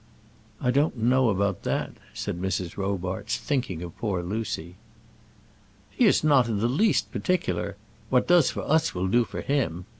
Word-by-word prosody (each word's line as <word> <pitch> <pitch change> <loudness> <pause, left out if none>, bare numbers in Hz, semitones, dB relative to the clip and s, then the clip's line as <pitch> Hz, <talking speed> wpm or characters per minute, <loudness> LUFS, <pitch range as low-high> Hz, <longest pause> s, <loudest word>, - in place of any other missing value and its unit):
"I 125 - +1
don't 140 +1 +1
know 125 +2 +3
about 100 -2 0
that," - - -2 0.2
said 90 - -4
Mrs. 95 -2 -2
Robarts, 95 +2 -2
thinking 120 - -2
of 85 -2 -8
poor 95 -6 -1
Lucy. 90 -3 -4 1.1
"He 250 - +2
is 205 - +4
not 140 -6 +4
in 110 -3 -1
the 110 +3 +1
least 190 - +2
particular. 100 - -1 0.3
What 125 -1 +2
does 175 -5 +5
for - - -4
us 160 -5 +2
will 90 +1 -1
do 120 +5 +3
for 100 - -6
him. 115 - -1
110 Hz, 160 wpm, -26 LUFS, 95-130 Hz, 1.1 s, does